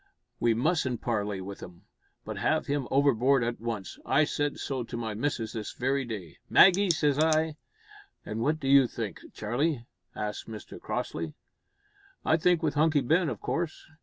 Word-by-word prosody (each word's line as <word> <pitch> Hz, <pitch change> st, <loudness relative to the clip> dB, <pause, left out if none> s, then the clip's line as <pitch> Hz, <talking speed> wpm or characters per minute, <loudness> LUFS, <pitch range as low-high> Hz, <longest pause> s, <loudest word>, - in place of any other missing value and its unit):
"We 115 Hz, -1 st, +3 dB
mustn't 130 Hz, -2 st, +1 dB
parley 105 Hz, -4 st, -1 dB
with 100 Hz, +1 st, -7 dB
him, 90 Hz, -2 st, -11 dB, 0.4 s
but -, -, -5 dB
heave 155 Hz, 0 st, +1 dB
him 140 Hz, -3 st, -1 dB
overboard 135 Hz, -1 st, +3 dB
at 120 Hz, -1 st, -3 dB
once! 110 Hz, -5 st, -4 dB
I 145 Hz, -, +3 dB
said 145 Hz, -1 st, -1 dB
so 130 Hz, -3 st, -3 dB
to 120 Hz, -, -6 dB
my 110 Hz, -2 st, -3 dB
missus 115 Hz, -1 st, -2 dB
this 110 Hz, -2 st, -5 dB
very 135 Hz, +2 st, 0 dB
day. 100 Hz, -9 st, -7 dB
`Maggie,' 190 Hz, 0 st, +7 dB
says 150 Hz, -4 st, +1 dB
I 155 Hz, 0 st, +2 dB, 0.3 s
" -, -, -22 dB
"And 110 Hz, +2 st, -4 dB
what 155 Hz, +6 st, +1 dB
do 135 Hz, -, -4 dB
you 135 Hz, -2 st, +6 dB
think, 110 Hz, -6 st, -5 dB
Charlie?" 120 Hz, +4 st, -1 dB, 0.3 s
asked 105 Hz, -1 st, -4 dB
Mr 110 Hz, -2 st, -9 dB
Crossley. 80 Hz, -1 st, -3 dB, 0.9 s
"I 160 Hz, -, +4 dB
think 175 Hz, 0 st, +2 dB
with 155 Hz, -, +1 dB
Hunky 155 Hz, 0 st, +3 dB
Ben, 160 Hz, +5 st, +2 dB
of 115 Hz, -7 st, -5 dB
course. 155 Hz, +5 st, -3 dB
130 Hz, 170 wpm, -28 LUFS, 110-155 Hz, 0.9 s, `Maggie